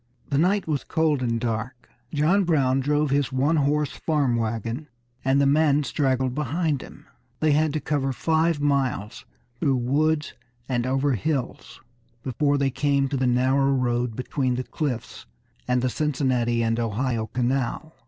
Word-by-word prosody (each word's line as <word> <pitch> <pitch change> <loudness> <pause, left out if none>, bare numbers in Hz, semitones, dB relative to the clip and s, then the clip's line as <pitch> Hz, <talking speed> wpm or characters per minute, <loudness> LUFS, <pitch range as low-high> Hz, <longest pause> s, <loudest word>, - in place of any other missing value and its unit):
The 140 - +2
night 190 +4 +2
was 150 -3 -1
cold 155 -4 +1
and 115 -2 0
dark. 115 +2 -4 0.2
John 165 +7 +2
Brown 135 -6 +2
drove 145 +1 +1
his 140 -1 +1
one 140 +5 +2
horse 145 -1 +1
farm 145 -6 0
wagon, 115 +5 -3 0.4
and 135 +1 +3
the 140 - +4
men 145 0 +3
straggled 130 -2 0
behind 150 +1 -1
him. - - -13 0.3
They 155 -1 +2
had 155 +1 +2
to 155 - 0
cover 140 -1 -1
five 160 +3 +1
miles 135 -8 -1 0.3
through 140 -4 +2
woods 150 +5 0 0.3
and 125 -1 -1
over 135 +2 +1
hills 130 +3 -3 0.4
before 145 +3 +1
they 140 -1 +1
came 140 +1 +1
down 135 - -1
to 140 - -1
the 130 0 +1
narrow 130 +3 +2
road 120 -2 0
between 130 0 -1
the 130 - -2
cliffs 125 -5 -4 0.4
and 125 0 +1
the - - +2
Cincinnati 125 -5 0
and 115 +1 0
Ohio 115 0 -1
canal. 130 +6 -2
135 Hz, 160 wpm, -24 LUFS, 125-150 Hz, 0.4 s, the